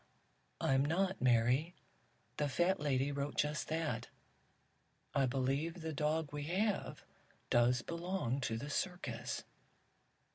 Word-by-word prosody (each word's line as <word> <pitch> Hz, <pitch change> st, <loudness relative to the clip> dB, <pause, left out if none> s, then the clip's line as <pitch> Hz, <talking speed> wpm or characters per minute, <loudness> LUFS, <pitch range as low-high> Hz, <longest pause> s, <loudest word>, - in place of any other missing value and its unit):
"I'm 135 Hz, 0 st, +3 dB
not, 190 Hz, +6 st, +1 dB
Mary. 125 Hz, +7 st, +3 dB, 0.6 s
The 145 Hz, -1 st, +1 dB
fat 175 Hz, +8 st, +2 dB
lady 140 Hz, -1 st, +1 dB
wrote 140 Hz, 0 st, -3 dB
just 150 Hz, +1 st, 0 dB
that. 160 Hz, -1 st, -1 dB, 1.1 s
I 135 Hz, -2 st, +3 dB
believe 140 Hz, +7 st, 0 dB
the 160 Hz, 0 st, -3 dB
dog 150 Hz, +1 st, 0 dB
we 145 Hz, -1 st, -3 dB
have 195 Hz, +5 st, -1 dB, 0.5 s
does 120 Hz, +1 st, +4 dB
belong 170 Hz, -6 st, -2 dB
to 115 Hz, -3 st, -1 dB
the 140 Hz, +5 st, -5 dB
circus." 160 Hz, -10 st, -2 dB
145 Hz, 115 wpm, -36 LUFS, 130-170 Hz, 1.1 s, does